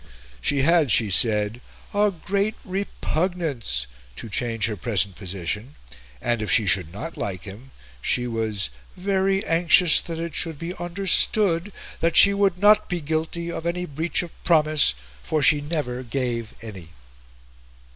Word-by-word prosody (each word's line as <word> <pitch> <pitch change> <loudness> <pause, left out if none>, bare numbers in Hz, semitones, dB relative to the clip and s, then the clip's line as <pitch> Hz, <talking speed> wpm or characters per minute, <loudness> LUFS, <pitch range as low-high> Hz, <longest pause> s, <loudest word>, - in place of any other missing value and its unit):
She 140 - +1
had, 165 -2 +3
she 110 -2 +2
said, 105 +3 +3 0.3
"a 205 +1 +3
great 200 +4 -2
repugnance" 170 - -2 0.3
to 115 - -8
change 115 +1 -1
her 110 -1 -2
present 100 -2 0
position; 100 - -5 0.4
and, 120 - -1
if 105 - -4
she 110 +4 +4
should 90 -3 +2
not 115 - -7
like 95 -3 -4
him, 105 +6 -11 0.3
she 125 - 0
was 110 - -3 0.3
"very 195 +1 0
anxious 170 0 +5
that 165 -1 -6
it 165 -1 -5
should 160 -1 -2
be 170 +4 -5
understood 185 +1 +2 0.3
that 165 0 +1
she 200 - +8
would 200 -3 +1
not 210 +2 +4
be 180 - -2
guilty 160 +2 -3
of 170 0 -5
any 180 +1 -2
breach 160 +3 -2
of 170 - -9
promise, 155 - +3 0.3
for 155 - -1
she 150 0 +5
never 145 -5 -3
gave 120 -3 -3
any." 95 -7 -9
150 Hz, 145 wpm, -23 LUFS, 110-175 Hz, 0.4 s, she